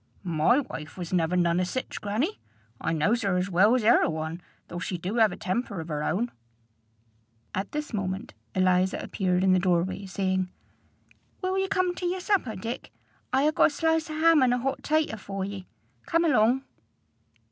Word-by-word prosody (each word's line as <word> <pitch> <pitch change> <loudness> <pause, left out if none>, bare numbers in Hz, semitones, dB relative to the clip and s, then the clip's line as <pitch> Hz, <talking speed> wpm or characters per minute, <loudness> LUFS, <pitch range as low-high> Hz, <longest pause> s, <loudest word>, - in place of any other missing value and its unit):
"My 175 - +3
wife 155 - -8
was 175 -1 -5
never 175 0 +2
none 170 0 +2
o' - - +2
sich, 255 +8 -4
grannie. 225 - -1 0.4
I 160 - -1
knows 200 +10 +1
her 195 -4 +1
as 185 +2 -1
well's 210 +7 +4
e'er 225 - +6
a - - +2
one, 160 +2 -4 0.3
though 175 - -6
she 180 0 -3
do 190 +7 -2
'ave 220 -2 +4
a - - -15
temper 200 0 -2
of 160 +1 -6
her 150 -1 -2
own." 235 +10 0 1.2
At 190 +2 -3
this 300 -3 -4
moment 190 -2 -3 0.2
Eliza 185 0 +3
appeared 180 -1 0
in 190 -1 +5
the 185 - +4
door 175 -2 +2
way, 190 +1 -5
saying, 190 -1 -1 0.9
"Will 370 0 0
ye 385 0 +1
come 370 -2 +1
to 355 0 -3
yer 365 +2 -1
supper, 365 - 0
Dick? 225 +6 -6 0.4
I 265 +2 +3
ha' 305 - +3
got - - +5
a - - -1
slice 320 +1 0
o' 310 - -4
ham 325 -2 +6
an' 250 -1 +4
a - - +2
hot 270 +2 -2
tater 310 -7 +1
for 195 -1 -4
ye. 195 -2 -7 0.4
Come 335 +1 +2
along." 255 -3 +3
200 Hz, 195 wpm, -27 LUFS, 180-265 Hz, 1.2 s, e'er